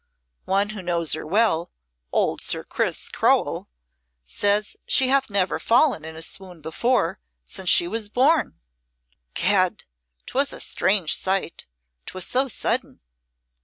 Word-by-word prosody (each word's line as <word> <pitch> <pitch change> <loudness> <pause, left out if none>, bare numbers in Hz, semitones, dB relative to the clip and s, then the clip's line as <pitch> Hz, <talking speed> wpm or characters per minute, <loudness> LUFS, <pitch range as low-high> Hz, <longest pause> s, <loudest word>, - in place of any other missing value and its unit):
One 200 +2 +1
who 215 -2 -7
knows 170 -3 0
her - - -5
well 175 -3 +1 0.4
old - - +1
Sir - - 0
Chris - - -1
Crowell - - 0 0.5
says 205 - 0
she 260 -1 +3
hath 270 -1 +2
never 195 -2 0
fallen 240 - +2
in 160 0 -9
a 160 - -4
swoon 180 0 -5
before 170 - -1 0.3
since 190 -2 -2
she 170 - +6
was 215 +2 -2
born. 280 +8 +1 0.8
Gad! 185 -1 +2 0.4
'twas 275 +2 0
a - - -6
strange 190 -5 +2
sight 190 -2 -2 0.4
'twas 185 -1 -5
so 265 +2 0
sudden." 250 - -2
195 Hz, 130 wpm, -23 LUFS, 175-230 Hz, 0.8 s, she